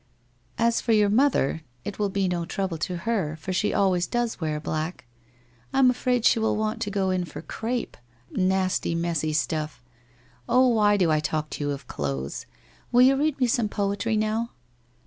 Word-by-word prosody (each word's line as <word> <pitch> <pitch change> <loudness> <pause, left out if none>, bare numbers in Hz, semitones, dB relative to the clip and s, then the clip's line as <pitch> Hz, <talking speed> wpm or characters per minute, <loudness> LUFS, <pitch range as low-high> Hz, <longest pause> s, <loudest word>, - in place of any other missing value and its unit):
1 230 - +3
As 235 - +1
for 230 - +1
your 210 -2 +4
mother, 220 - +2 0.2
it 200 - -5
will 205 -1 +1
be 195 0 0
no 175 -1 -1
trouble 175 -1 -3
to 180 +3 -2
her, 195 -10 0
for 175 +4 -5
she 210 +3 +1
always 185 -3 +2
does 240 -5 -2
wear 155 -1 -1
black. 155 +2 -4 0.7
I - - 0
am 260 -2 +6
afraid 250 -1 0
she - - +5
will 220 -1 +1
want 215 +1 -2
to 215 - -1
go 195 -2 0
in 185 -1 0
for 150 -2 -8
crape 235 +5 -3 0.3
— - - -36
nasty 185 -2 +1
messy 165 -2 -1
stuff! 155 -2 -2 0.7
Oh, 255 +2 +5
why 210 -3 +4
do 175 -5 +3
I 155 - +3
talk 150 0 -2
to - - -4
you 145 - -1
of 140 -2 -4
clothes! 70 - -4 0.4
Will 245 +1 +6
you 265 +1 +6
read 290 0 0
me 255 - +4
some 230 -2 +1
poetry 205 +2 -1
now?' 220 +2 0
195 Hz, 195 wpm, -25 LUFS, 160-230 Hz, 0.7 s, am